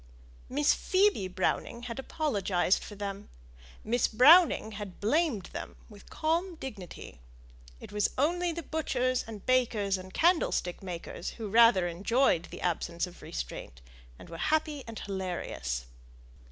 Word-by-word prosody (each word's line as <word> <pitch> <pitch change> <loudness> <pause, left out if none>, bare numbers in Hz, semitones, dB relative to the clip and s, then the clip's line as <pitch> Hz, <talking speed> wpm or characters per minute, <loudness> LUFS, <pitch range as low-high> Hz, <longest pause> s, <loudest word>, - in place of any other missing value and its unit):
Miss 290 +3 +3
Phoebe 380 - +2
Browning 185 +5 -2
had 240 0 -5
apologized 200 - 0
for 205 - -9
them 200 0 -6 0.5
Miss 235 +2 +2
Browning 280 0 +6
had 205 -3 -8
blamed 235 - 0
them - - -6
with 205 -2 -15
calm 335 +3 -1
dignity; 210 - -9 0.6
it - - -11
was 210 -1 +1
only 345 +5 +1
the 335 0 -5
butchers 255 -5 0
and 215 -3 -9
bakers 220 -6 +2
and 185 0 -10
candlestick 320 - +1
makers 180 -1 -6
who 220 -3 -5
rather 230 -5 +6
enjoyed 190 +1 +2
the - - -10
absence 170 0 -1
of 180 0 -13
restraint, - - -6 0.4
and - - -13
were 165 - -8
happy 305 -3 0
and 225 -1 -7
hilarious. 175 - -4
220 Hz, 135 wpm, -30 LUFS, 185-290 Hz, 0.6 s, Browning